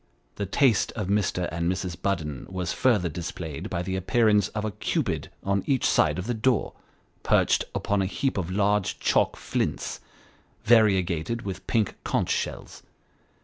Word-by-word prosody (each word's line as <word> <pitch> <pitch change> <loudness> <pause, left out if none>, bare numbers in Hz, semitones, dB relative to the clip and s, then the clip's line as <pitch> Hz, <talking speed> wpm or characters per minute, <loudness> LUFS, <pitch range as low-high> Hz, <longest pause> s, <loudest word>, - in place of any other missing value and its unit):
The 100 - -2
taste 120 +2 +3
of 105 -4 -4
Mr. 95 -3 +1
and 85 +2 0
Mrs. 90 -1 -3
Budden 85 -6 -3
was 90 -2 -3
further 110 -9 +2
displayed 80 -2 -5
by 85 - -2
the 95 +1 -3
appearance 105 +1 +3
of 105 0 -4
a 110 - -2
Cupid - - -2
on 100 0 +1
each 135 -3 +2
side - - +3
of 90 - -3
the 120 - -1
door, 115 -1 +1 0.5
perched - - +3
upon 100 -1 0
a 95 - 0
heap 135 +7 -1
of 90 -2 -3
large 100 +1 +1
chalk - - +2
flints, - - -2 0.7
variegated 105 -2 +3
with 95 -4 -6
pink 110 -4 0
conch - - 0
shells. - - -3
100 Hz, 155 wpm, -26 LUFS, 90-110 Hz, 0.7 s, taste